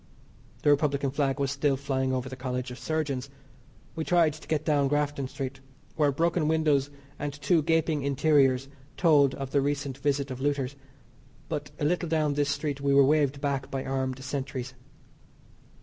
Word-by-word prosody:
The 145 - +5
Republican 140 -2 +1
flag 140 -1 0
was 140 -1 0
still 140 -1 +1
flying 130 -1 -1
over 130 -1 -2
the 130 - -6
College 125 -1 -4
of 125 - -8
Surgeons. 140 -4 -2 0.7
We 160 - -2
tried 165 -2 +3
to 155 - -13
get 155 -1 -1
down 145 -3 +3
Grafton 145 -1 0
Street 135 0 -5 0.4
(where 150 -3 +3
broken 165 +2 +1
windows 150 -3 +2 0.3
and 145 -1 -2
two 150 +3 +1
gaping 160 -1 +1
interiors 135 -2 +3 0.3
told 145 -6 +4
of 135 -1 -6
the 140 - +3
recent 140 -1 -2
visit 140 -1 0
of 130 0 -6
looters), 140 -1 -1 0.7
but 150 -2 -3
a 145 - 0
little 175 +1 0
down 155 -2 +1
this 145 0 0
street 145 -1 -2
we 140 0 +2
were 140 -1 +7
waved 140 -1 +2
back 140 -2 -1
by 135 -1 -3
armed 130 -1 -2
sentries. 130 -2 -4
140 Hz, 170 wpm, -28 LUFS, 135-150 Hz, 0.7 s, were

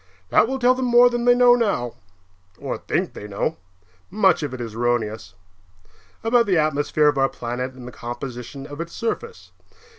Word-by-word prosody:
That 225 - +4
will 265 +2 -2
tell 250 0 +4
them 255 0 -2
more 245 0 +6
than 240 0 -2
they 245 0 +6
know 245 0 +6
now 200 - 0 0.6
(or - - -5
think - - -2
they 105 - -8
know; 100 -1 -2 0.5
much 190 -4 +3
of 145 -4 -3
it 130 - -7
is 115 -2 -6
erroneous) 110 -5 -2 0.9
about 230 0 +3
the 185 -3 +2
atmosphere 150 0 +2
of 145 -2 +2
our 135 0 +3
planet 125 +1 -5
and 125 -1 -11
the - - -8
composition 125 +3 -7
of 145 +2 -7
its 170 0 -7
surface. 460 - -5
145 Hz, 180 wpm, -22 LUFS, -, 0.9 s, more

